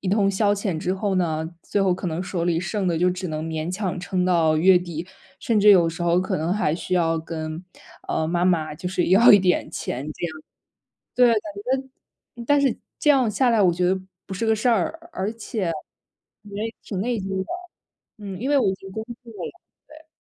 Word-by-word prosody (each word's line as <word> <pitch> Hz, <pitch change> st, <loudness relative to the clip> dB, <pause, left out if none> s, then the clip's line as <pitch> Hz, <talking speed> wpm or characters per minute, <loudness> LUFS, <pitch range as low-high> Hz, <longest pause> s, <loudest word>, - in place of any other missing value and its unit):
一 190 Hz, -, -3 dB
通 200 Hz, -1 st, +3 dB
消 205 Hz, +1 st, +2 dB
遣 200 Hz, -5 st, -2 dB
之 180 Hz, +3 st, -1 dB
后 195 Hz, +1 st, -1 dB
呢， 160 Hz, -3 st, 0 dB
最 205 Hz, -, -1 dB
后 190 Hz, -2 st, +3 dB
可 180 Hz, -, -5 dB
能 165 Hz, +1 st, -2 dB
手 180 Hz, -2 st, -3 dB
里 170 Hz, -1 st, +1 dB
剩 190 Hz, +2 st, -2 dB
的 170 Hz, -2 st, +1 dB
就 180 Hz, +2 st, +3 dB
只 180 Hz, 0 st, -4 dB
能 155 Hz, -1 st, -3 dB
勉 160 Hz, +1 st, -3 dB
强 185 Hz, -2 st, -2 dB
撑 180 Hz, +1 st, -1 dB
到 165 Hz, -3 st, +3 dB
月 180 Hz, +3 st, +6 dB
底， 170 Hz, -1 st, -6 dB, 0.3 s
甚 230 Hz, -2 st, +1 dB
至 210 Hz, +1 st, +7 dB
有 175 Hz, -4 st, +6 dB
时 165 Hz, +2 st, -5 dB
候 175 Hz, +1 st, +3 dB
可 185 Hz, -, -1 dB
能 160 Hz, +3 st, -1 dB
还 195 Hz, -7 st, +1 dB
需 175 Hz, -, -6 dB
要 165 Hz, -2 st, +2 dB
跟， 160 Hz, +1 st, -6 dB, 0.4 s
呃， 160 Hz, -, 0 dB
妈 175 Hz, +1 st, +1 dB
妈 160 Hz, -4 st, +1 dB
就 165 Hz, -, -7 dB
是 180 Hz, -1 st, 0 dB
要 195 Hz, +7 st, +7 dB
一 205 Hz, -, +9 dB
点 185 Hz, -2 st, +1 dB
钱 130 Hz, -, -4 dB
这 175 Hz, -, -4 dB
样。 160 Hz, -2 st, -7 dB, 0.8 s
对， 250 Hz, -, +6 dB
感 215 Hz, +4 st, -2 dB
觉 255 Hz, -2 st, -16 dB
但 290 Hz, +2 st, +4 dB
是 275 Hz, -3 st, +2 dB, 0.2 s
这 295 Hz, -, +3 dB
样 265 Hz, -5 st, +4 dB
下 250 Hz, +4 st, +2 dB
来 230 Hz, -2 st, +3 dB
我 180 Hz, -2 st, +4 dB
觉 180 Hz, +2 st, -1 dB
得 190 Hz, +1 st, +1 dB, 0.3 s
不 -, -, -8 dB
是 225 Hz, +4 st, -2 dB
个 220 Hz, -, +4 dB
事 220 Hz, +3 st, 0 dB
儿， 325 Hz, -, 0 dB
而 200 Hz, -3 st, -2 dB
且 215 Hz, -5 st, -3 dB, 0.7 s
也 210 Hz, +2 st, -5 dB
挺 195 Hz, -3 st, -4 dB
内 240 Hz, +3 st, -1 dB
疚 195 Hz, -1 st, -3 dB
的， 190 Hz, -, -1 dB, 0.7 s
嗯， 200 Hz, -3 st, -7 dB
因 265 Hz, -, -1 dB
为 290 Hz, -, +4 dB
我 -, -, +2 dB
已 -, -, -2 dB
经 195 Hz, 0 st, -12 dB
工 220 Hz, +3 st, -5 dB, 0.2 s
作 235 Hz, -, -12 dB
了， -, -, -6 dB, 0.4 s
对。 310 Hz, +1 st, -15 dB
190 Hz, 240 characters per minute, -23 LUFS, 170-215 Hz, 0.8 s, 一